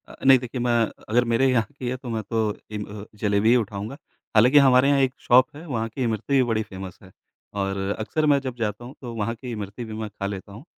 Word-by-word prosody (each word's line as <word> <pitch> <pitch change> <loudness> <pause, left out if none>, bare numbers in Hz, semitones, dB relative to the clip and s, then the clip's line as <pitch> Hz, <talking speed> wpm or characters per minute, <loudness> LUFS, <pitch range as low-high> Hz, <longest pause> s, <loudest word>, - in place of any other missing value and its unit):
अ, - - -12
नहीं 135 -1 +8
देखिए 125 0 -5
मैं 120 0 +1
अ, - - -13
अगर 120 +3 +3
मेरे 135 +3 +4
यहाँ 115 -3 +2
की 125 - -3
है 130 - -2
तो 125 -1 -9
मैं 110 -2 -2
तो 110 -2 +1 0.2
जिम 105 -1 -4 0.2
अ, - - -9 0.2
जलेबी 105 +1 +3
ही 120 - +6
उठाऊँगा, 110 +2 -2 0.4
हालाँकि 125 +7 +6
हमारे 130 +1 +5
यहाँ 140 -1 +4
एक 130 -1 +1
शॉप 130 +3 +4
है, 155 +4 -10
वहाँ 115 -7 -2
की 130 +4 -4
इमरती 115 +3 -2
भी 135 -2 +5
बड़ी 110 -1 +1
फेमस 95 -2 -9
है। 95 - -15 0.5
और 95 0 -2 0.2
अक्सर 155 +8 -1
मैं 140 - +4
जब 130 -2 -5
जाता 105 +1 -3
हूँ 130 - -10
तो 120 -3 -6
वहाँ 115 +1 -2
की 125 +1 -8
इमरती 105 +1 -6
भी 110 - -8
मैं 110 0 -4
खा 100 -1 -6
लेता 100 0 -6
हूँ 110 +6 -11
115 Hz, 255 wpm, -24 LUFS, 105-130 Hz, 0.5 s, नहीं